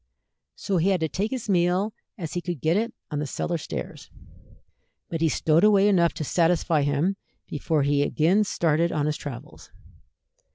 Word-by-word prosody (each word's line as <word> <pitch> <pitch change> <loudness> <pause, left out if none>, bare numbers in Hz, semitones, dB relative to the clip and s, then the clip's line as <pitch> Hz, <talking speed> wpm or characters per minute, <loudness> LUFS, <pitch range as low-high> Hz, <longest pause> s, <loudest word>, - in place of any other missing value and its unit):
So 195 -2 -2
he 175 +4 +2
had 190 -2 +2
to 160 - +1
take 200 +7 -2
his 255 -3 -5
meal 185 +2 +1 0.2
as 165 -5 -6
he 175 - -2
could 175 -4 -4
get 160 +4 +1
it 230 +3 0 0.2
on 150 - -2
the 150 - -3
cellar 170 +4 -2
stairs, - - -7 1.0
but 165 -1 -3
he 165 - +3
stowed 160 +3 +2
away 205 -1 +5
enough 175 -5 +3
to - - -3
satisfy 165 0 +2
him 145 +7 0 0.3
before 150 0 -1
he 140 0 +2
again 170 +8 +2
started 170 -3 +1
on 150 -2 0
his 150 0 0
travels. 130 -5 -9
170 Hz, 175 wpm, -25 LUFS, 150-190 Hz, 1.0 s, away